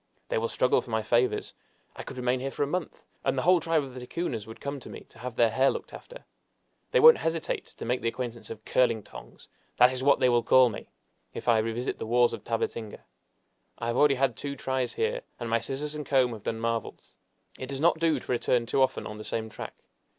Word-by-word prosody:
They - - +1
will 115 - -1
struggle 125 - +2
for - - -14
my 110 -1 0
favors. 120 +3 +1 0.4
I - - -7
could - - -9
remain 125 0 0
here 135 +2 -3
for 140 - -2
a - - -1
month, 180 +3 -4 0.2
and 135 0 0
the 130 - 0
whole 180 +1 +5
tribe 165 -1 +1
of 135 -2 -9
the 130 - -7
Ticunas 125 -4 -4
would 110 - -10
come 140 0 -4
to - - -11
me - - -9
to - - -18
have 125 0 -6
their 115 -2 +4
hair 130 +4 +3
looked - - -5
after! - - -11 0.6
They - - +3
won't 475 0 +9
hesitate 165 -1 -3
to - - -6
make 125 +2 0
the 115 - -1
acquaintance 120 0 -4
of 110 -1 -9
'curling 115 -4 +2
tongs' - - -13 0.3
that 125 +1 +7
is 130 - -4
what 140 +1 +4
they 130 - +4
will 120 -1 +3
call 130 +2 +5
me 105 - -8 0.5
if - - -7
I 115 -2 +5
revisit 115 +3 -2
the - - -5
walls 120 +1 +3
of - - -6
Tabatinga! 115 -1 -3 0.7
I - - -5
have 120 0 -1
already 145 +1 +5
had 135 -2 +1
two 140 -1 -5
tries 130 -1 -2
here, 480 +2 -1 0.2
and 120 -2 -4
my 115 - +3
scissors 135 +6 -4
and 150 0 -4
comb 130 -4 +2
have 110 - -8
done 110 +2 -3
marvels! 115 0 -3 0.5
It 130 - -5
does 135 0 -5
not 165 +1 +3
do 160 -4 +2
to - - -7
return 120 0 +1
too 125 +3 +1
often 130 - +1
on 105 0 -7
the - - -7
same 110 0 -3
track. - - -8
125 Hz, 240 wpm, -28 LUFS, 115-140 Hz, 0.7 s, won't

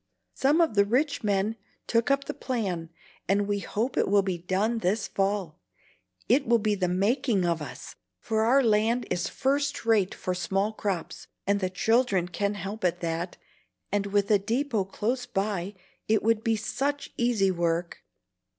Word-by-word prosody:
Some 290 +5 +3
of 320 -9 +2
the 200 -1 +5
rich 265 +8 0
men 205 +2 0 0.3
took 230 +2 +1
up 275 0 +2
the - - -5
plan, 190 -10 -3 0.4
and 200 +1 +2
we 205 0 0
hope 220 +7 -2
it - - +2
will 200 0 +4
be 185 -3 -2
done 200 +6 0
this 205 +1 0
fall. 195 -5 -1 0.7
It 270 +4 +3
will 235 - +5
be 215 -1 0
the 185 -3 0
making 200 +2 +1
of 170 -2 0
us, 145 - -8 0.3
for 220 - -1
our 255 +5 +4
land 225 +2 +2
is 175 - 0
first 280 0 -1
rate 215 -5 +2
for 185 - -3
small 195 +4 -1
crops, 195 -5 -4 0.2
and 200 +1 +2
the 185 -2 -1
children 195 -1 +2
can 200 +3 -1
help 200 +2 -6
at 180 -2 0
that, 170 +1 -3 0.5
and 200 0 0
with 200 +1 +1
a 205 - +5
deepot 225 -2 -1
close 245 +5 -2
by 200 -3 -2 0.3
it 220 0 +2
would 225 0 +2
be 225 -1 +2
such 275 +7 -2
easy 230 -6 +2
work. 170 -1 -1
205 Hz, 170 wpm, -27 LUFS, 190-235 Hz, 0.7 s, the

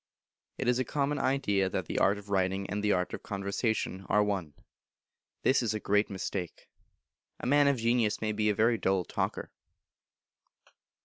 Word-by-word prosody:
It 130 - -3
is 125 0 +3
a - - +2
Common 145 +3 -1
Idea 100 -8 +1
that - - -2
the - - -2
art 100 +1 +3
of 100 0 -11
writing 95 0 0
and 105 +2 -3
the 105 - +2
art 90 -1 0
of - - -5
conversation 100 0 -2
are 105 +1 +4
one; 95 -8 -2 0.9
this 130 - +4
is 110 -3 -1
a - - -2
great 105 +1 +1
mistake. 95 -2 -5 0.7
A - - -6
man 145 +2 +4
of 140 -2 +3
genius 115 -2 +1
may 110 -1 -1
be 105 0 +1
a 105 - +1
very 115 +2 +3
dull 95 -2 +1
talker. - - -3
105 Hz, 175 wpm, -30 LUFS, 95-120 Hz, 0.9 s, are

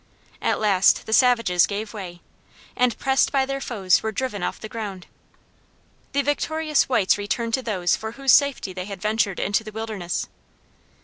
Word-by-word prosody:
At - - 0
last 195 -3 +3
the 220 - -3
savages 230 -8 +4
gave 210 +2 -5
way, 180 -5 -8 0.5
and, 250 -2 +1
pressed 265 -1 +2
by 270 -2 +2
their 275 0 -4
foes, 195 -8 +1
were 220 - -2
driven 220 -3 -3
off - - -3
the 215 - -7
ground. 205 -5 -6 1.1
The 280 0 +1
victorious 305 +1 0
whites 205 -5 +2
returned 230 +3 -2
to 260 - +1
those 185 -7 0
for 220 0 -6
whose 275 0 +2
safety 280 -9 +3
they 180 0 -5
had 200 -2 -7
ventured 210 -1 0
into 205 +2 0
the 215 - -8
wilderness. 210 -6 -4
220 Hz, 170 wpm, -23 LUFS, 195-255 Hz, 1.1 s, savages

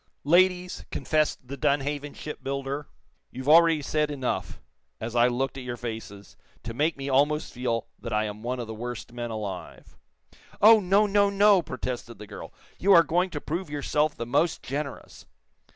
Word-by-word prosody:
"Ladies," 180 +3 +3
confessed 155 -4 0
the 140 - -5
Dunhaven 145 +2 -1
shipbuilder, 140 -1 -5 0.4
"you've 130 +2 -8
already 165 -1 +6
said 150 +1 0
enough, 135 -4 -3 0.4
as 115 +2 -5
I 120 0 +5
looked 135 +2 -2
at - - -7
your 120 -1 -5
faces, 110 -4 -7 0.3
to 115 - -5
make 150 +6 0
me 135 0 -5
almost 145 +3 +1
feel 120 -2 -2
that - - -7
I 105 0 +1
am 105 0 -5
one 125 +2 -3
of 120 - -3
the 110 - -7
worst 120 +1 -6
men 120 -1 -4
alive." 100 -5 -7 0.6
"Oh, 220 +2 +8
no, 200 +2 +3
no, 200 0 +3
no!" 200 -1 +5
protested 125 -5 -5
the 105 - -9
girl. - - -9 0.3
"You 195 +2 +5
are 170 - +8
going 180 +3 +1
to 150 - -5
prove 170 +4 -4
yourself 150 +1 0
the 115 - -5
most 145 +7 +1
generous." 140 0 -6
140 Hz, 170 wpm, -26 LUFS, 120-160 Hz, 0.6 s, Oh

